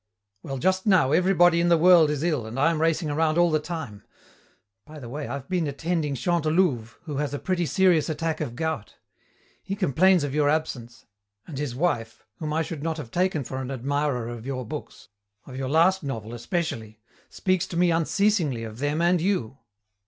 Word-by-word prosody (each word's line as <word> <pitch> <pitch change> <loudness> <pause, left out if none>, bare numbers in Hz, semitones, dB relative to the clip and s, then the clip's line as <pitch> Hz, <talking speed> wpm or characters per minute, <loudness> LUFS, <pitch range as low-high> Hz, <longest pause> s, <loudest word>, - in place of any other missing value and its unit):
"Well, 135 - -5
just 185 - 0
now 180 -10 +4
everybody 175 0 +4
in 175 - +2
the 170 - +5
world 170 -2 +6
is 150 0 -2
ill 150 -10 0
and 115 +3 -7
I 165 +4 +4
am 160 -2 -2
racing 165 -1 +1
around 155 +1 +1
all 175 -1 +4
the 155 - +2
time. 150 - -6 0.8
By 155 +5 -12
the 130 -5 -9
way, 145 +4 -5
I've 140 -2 -6
been 180 -4 0
attending 150 0 -2
Chantelouve, 155 -5 0
who 150 -5 -5
has 145 0 -2
a - - -2
pretty 175 +1 -1
serious 180 -5 +3
attack 160 0 -2
of 125 -6 -4
gout. 155 -6 -3 0.7
He 195 - -4
complains 185 -1 +3
of 140 -2 -3
your 150 -1 +2
absence, 130 -6 -3 0.4
and 140 -5 -7
his 145 -5 -3
wife, 120 -9 -2
whom 155 -1 -3
I 160 +1 +1
should 160 -3 -6
not 160 +1 -2
have 135 -7 -8
taken 180 -5 0
for 130 +2 -5
an 130 - -5
admirer 135 -1 -1
of 120 -2 -7
your 130 -1 -4
books, 145 0 -8 0.4
of 130 - -10
your 130 0 -3
last 175 +6 +3
novel 115 -6 -5
especially, 120 - -4 0.3
speaks 185 -1 0
to 170 - -5
me 175 0 +3
unceasingly 165 - +1
of 110 0 -8
them 145 +4 0
and 175 0 +3
you. 135 - -1
155 Hz, 195 wpm, -25 LUFS, 135-175 Hz, 0.8 s, world